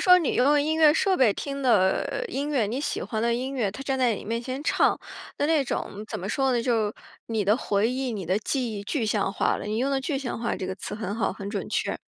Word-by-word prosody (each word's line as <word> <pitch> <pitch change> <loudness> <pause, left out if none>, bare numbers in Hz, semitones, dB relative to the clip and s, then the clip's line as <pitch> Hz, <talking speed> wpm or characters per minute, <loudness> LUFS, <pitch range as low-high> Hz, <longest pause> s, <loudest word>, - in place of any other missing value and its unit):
说 360 -1 +7
你 330 - 0
用 290 +3 +4
音 310 +2 0
乐 310 -1 +6
设 380 +3 +2
备 255 - +4
听 280 -1 -4
的 230 - +2
音 285 +2 -2
乐， 265 -7 +2
你 245 +6 -2
喜 - - -2
欢 220 -2 -3
的 235 0 +2
音 260 +3 -3
乐， 225 -7 0
他 265 - -8
站 270 -1 -1
在 245 -4 +3
你 - - -8
面 230 +3 -2
前 260 +4 -5
唱。 - - +3 0.4
那 - - 0
那 315 -3 +3
种 210 -4 -4
怎 - - -4
么 185 - -5
说 265 +5 +1
呢？ 235 -1 +1
就 230 -4 +2
是 205 - -5 0.3
你 220 -3 -1
的 205 - +4
回 210 -4 +1
忆， 260 0 -2
你 200 -5 -4
的 185 +5 +1
记 245 0 -2
忆， 200 - -5
具 255 +1 -1
象 210 -2 +1
化 - - +1
了。 - - -6
你 215 +1 -2
用 265 +4 +1
的 270 - +1
具 275 +1 -2
象 250 -4 -4
化 235 - -1
这 185 - -4
个 190 - -3
词 205 - -6
很 205 -2 -4
好， 225 - 0
很 200 0 -6
准 205 -2 -4
确。 - - -1
240 Hz, 295 characters per minute, -26 LUFS, 210-275 Hz, 0.4 s, 说